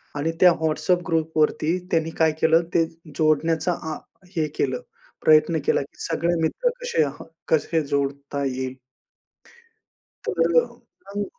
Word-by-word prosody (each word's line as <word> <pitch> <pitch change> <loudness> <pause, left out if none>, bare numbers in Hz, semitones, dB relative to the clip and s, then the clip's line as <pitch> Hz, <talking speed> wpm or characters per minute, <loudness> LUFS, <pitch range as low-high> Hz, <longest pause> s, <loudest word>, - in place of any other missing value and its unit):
आणि 155 +3 -1
त्या 180 -1 +8
व्हॉट्सॲप 160 +3 +1
ग्रुपवरती 160 0 +1
त्यांनी 165 -1 +1
काय 160 -1 +4
केलं, 165 +1 +5
ते 165 - +4 0.3
जोडण्याचा 160 +2 +2 0.2
अ - - -5 0.4
हे 160 -2 +1
केलं, 130 -2 0 0.5
प्रयत्न 155 +1 +5
केला - - +2
की 140 - -12
सगळे 170 +1 +1
मित्र - - +1
कसे 485 - +1
ह, 145 0 -5 0.3
कसे 160 +1 +2
जोडता 140 0 -2
येईल. 130 0 -3 1.5
तर, 165 -1 +1 0.6
हं. 205 - -1
160 Hz, 125 wpm, -23 LUFS, 145-165 Hz, 1.5 s, त्या